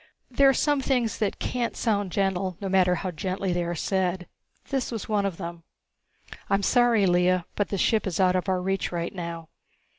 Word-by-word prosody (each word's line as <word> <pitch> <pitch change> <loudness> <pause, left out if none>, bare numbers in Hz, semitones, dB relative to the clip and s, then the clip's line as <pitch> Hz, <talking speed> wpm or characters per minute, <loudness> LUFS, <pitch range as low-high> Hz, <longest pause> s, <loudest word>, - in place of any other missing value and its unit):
There 275 +2 +5
are - - +4
some 290 -2 +2
things 250 -5 0
that 210 -2 -1
can't 245 -2 -2
sound 205 -5 0
gentle, 190 -2 -1
no 200 - -4
matter 185 -1 +3
how 185 +1 -3
gently 185 +3 -2
they 175 0 0
are 170 0 -3
said. 185 0 -1 0.4
This 270 -3 -1
was 225 -3 -5
one 205 -2 +1
of 180 -4 -5
them. 170 -2 -6 0.9
"I'm 200 0 +2
sorry, 240 -4 +4
Lea, 180 0 +3
but 205 - -1
the 200 - -2
ship 215 +2 +2
is 180 -1 -3
out 185 -1 +4
of 185 +1 -1
our 185 -1 0
reach 195 0 -1
right 170 -1 -3
now. 170 -3 -6
190 Hz, 200 wpm, -26 LUFS, 180-210 Hz, 0.9 s, There